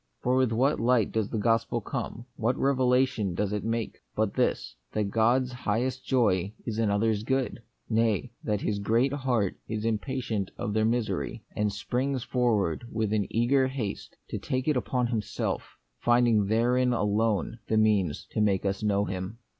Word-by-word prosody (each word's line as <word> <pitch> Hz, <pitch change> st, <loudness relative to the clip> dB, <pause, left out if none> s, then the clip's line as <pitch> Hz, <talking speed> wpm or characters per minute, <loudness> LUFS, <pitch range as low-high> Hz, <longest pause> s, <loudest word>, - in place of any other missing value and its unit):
For 125 Hz, +1 st, +2 dB
with 130 Hz, -3 st, +3 dB
what 130 Hz, +6 st, +2 dB
light 115 Hz, -2 st, +3 dB
does 110 Hz, -2 st, -1 dB
the 115 Hz, -, -2 dB
gospel 115 Hz, +2 st, +1 dB
come, 115 Hz, +2 st, -5 dB
what 120 Hz, +2 st, 0 dB
revelation 130 Hz, -7 st, +2 dB
does 105 Hz, +2 st, -1 dB
it 105 Hz, -2 st, -2 dB
make, 115 Hz, 0 st, -2 dB, 0.2 s
but 110 Hz, -2 st, 0 dB
this, -, -, 0 dB, 0.2 s
that 105 Hz, -2 st, -1 dB
God's 120 Hz, +4 st, +2 dB
highest 125 Hz, +2 st, -1 dB
joy 105 Hz, -7 st, +1 dB
is 115 Hz, -2 st, -3 dB
in 110 Hz, -2 st, +2 dB
others' 105 Hz, +1 st, +1 dB
good? 130 Hz, +1 st, -1 dB, 0.3 s
nay, 115 Hz, +1 st, +1 dB
that 105 Hz, -3 st, -1 dB
His 100 Hz, -1 st, -1 dB
great 115 Hz, +7 st, +2 dB
heart 125 Hz, -8 st, 0 dB
is 110 Hz, 0 st, -3 dB
impatient 115 Hz, -3 st, -1 dB
of 105 Hz, -, -3 dB
their 110 Hz, 0 st, +2 dB
misery, 115 Hz, 0 st, -1 dB
and 105 Hz, 0 st, +1 dB
springs 125 Hz, +6 st, -2 dB
forward 120 Hz, -, +1 dB
with 110 Hz, -1 st, -1 dB
an 105 Hz, -3 st, +1 dB
eager 130 Hz, +4 st, +3 dB
haste 125 Hz, -7 st, -5 dB
to -, -, -3 dB
take 130 Hz, +2 st, -2 dB
it 150 Hz, -, +3 dB, 0.2 s
on 125 Hz, -1 st, +2 dB
Himself, 115 Hz, -4 st, -3 dB, 0.2 s
finding 120 Hz, -4 st, +3 dB
therein 125 Hz, +3 st, +2 dB
alone 110 Hz, 0 st, 0 dB
the 110 Hz, -, +1 dB
means 105 Hz, -7 st, +2 dB
to -, -, 0 dB
make 100 Hz, -2 st, +2 dB
us 100 Hz, 0 st, -1 dB
know 100 Hz, -1 st, +2 dB
Him. 95 Hz, +3 st, -5 dB
115 Hz, 170 wpm, -28 LUFS, 105-125 Hz, 0.3 s, with